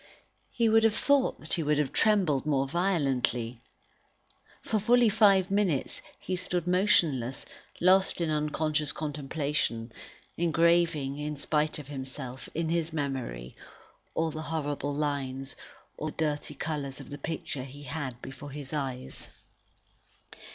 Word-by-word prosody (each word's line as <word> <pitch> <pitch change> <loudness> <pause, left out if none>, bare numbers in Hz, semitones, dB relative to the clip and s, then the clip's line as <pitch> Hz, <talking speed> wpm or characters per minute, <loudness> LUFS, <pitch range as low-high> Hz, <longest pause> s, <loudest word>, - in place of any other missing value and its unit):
He 235 -1 +1
would 225 0 +5
have 225 -1 +4
thought 280 -2 +2
that 155 - -2
he 170 - +3
would 150 -1 +2
have 145 -2 0
trembled 190 -11 +3
more 140 -3 +1
violently. 135 -9 0 1.0
For 215 - 0
fully 240 +2 +5
five 200 -3 +5
minutes, 195 -9 +1 0.2
he 185 - -2
stood 180 -1 -1
motionless, 170 - +2 0.3
lost 190 +2 +4
in 165 -2 0
unconscious 150 0 0
contemplation, 145 -5 -2 0.5
engraving, 165 -4 +2
in 150 0 -3
spite 150 +2 +1
of 150 -3 -8
himself, 130 -2 -6
in 165 0 0
his 165 0 0
memory, 130 - -3 0.6
all 165 0 +1
the 155 - -5
horrible 145 -2 -2
lines, 135 -2 -2 0.4
all 155 - -3
the 155 - -4
dirty 150 -2 -2
colours 140 -3 -3
of - - -10
the 145 - -6
picture 150 -2 -4
he 140 +2 -10
had 135 -3 -4
before 135 +2 -8
his 140 0 -6
eyes. 130 -4 -4
150 Hz, 135 wpm, -29 LUFS, 135-170 Hz, 1.0 s, would